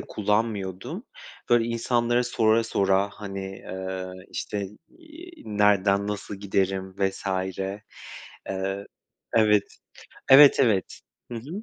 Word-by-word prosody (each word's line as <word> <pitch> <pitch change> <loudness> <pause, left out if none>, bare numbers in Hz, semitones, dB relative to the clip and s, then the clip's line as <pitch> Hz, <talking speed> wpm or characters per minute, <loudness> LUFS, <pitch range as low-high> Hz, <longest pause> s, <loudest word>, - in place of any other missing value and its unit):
kullanmıyordum. 105 -3 -2 0.5
Böyle 120 -1 +5
insanlara 120 +1 +1
sora 115 -1 +2
sora, 100 -2 +1
hani, 100 -2 -7 0.2
eee, 95 0 -5 0.3
işte, 100 -2 -4 0.3
eee, 330 +2 -13
"Nereden 100 -1 +2
nasıl 105 0 -4
giderim?" 95 -1 -1
vs. 95 0 -1 0.3
eee 95 +2 -4 1.5
Evet, 105 -2 +3 0.5
evet, 140 +1 +9
evet. 105 -7 +1 0.3
Hı 120 - -4
hı. 160 - -7
105 Hz, 100 wpm, -25 LUFS, 95-115 Hz, 1.5 s, evet